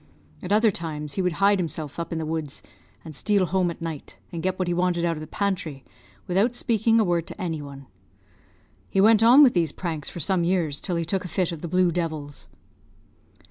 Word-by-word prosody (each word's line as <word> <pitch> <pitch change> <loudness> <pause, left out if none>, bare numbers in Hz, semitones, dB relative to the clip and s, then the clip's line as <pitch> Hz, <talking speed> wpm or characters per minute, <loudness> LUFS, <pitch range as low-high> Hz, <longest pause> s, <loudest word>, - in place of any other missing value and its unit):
At 180 - -6
other 215 +1 +4
times 150 -4 -5
he 190 - -1
would 180 -2 0
hide 200 +2 +3
himself 155 -3 -4
up 170 - -4
in 165 - -2
the 160 - -3
woods, 155 -3 -4 0.4
and 155 -2 -9
steal 200 +3 +2
home 185 0 +1
at 170 - -7
night, 160 -4 -6
and 170 -2 -5
get 185 +1 -1
what 185 - -1
he 175 - 0
wanted 175 -1 +1
out 170 -1 0
of 155 - -7
the 155 - -7
pantry, 165 -8 -3 0.4
without 200 +7 +1
speaking 225 -1 +2
a - - +4
word 175 -3 0
to - - -10
any 165 -4 -3
one. 140 -1 -10 1.0
He 195 - 0
went 215 +2 +6
on 245 +6 +8
with 255 - +5
these 165 -4 +1
pranks 160 -5 -5
for - - -8
some 175 +2 0
years, 170 -5 0
till 180 - -2
he 170 0 -1
took 190 +3 -1
a - - -5
fit 180 -1 -1
of 165 -3 -7
the 170 - -4
blue 180 +1 +2
devils. 155 -4 -4
175 Hz, 220 wpm, -25 LUFS, 160-190 Hz, 1.0 s, on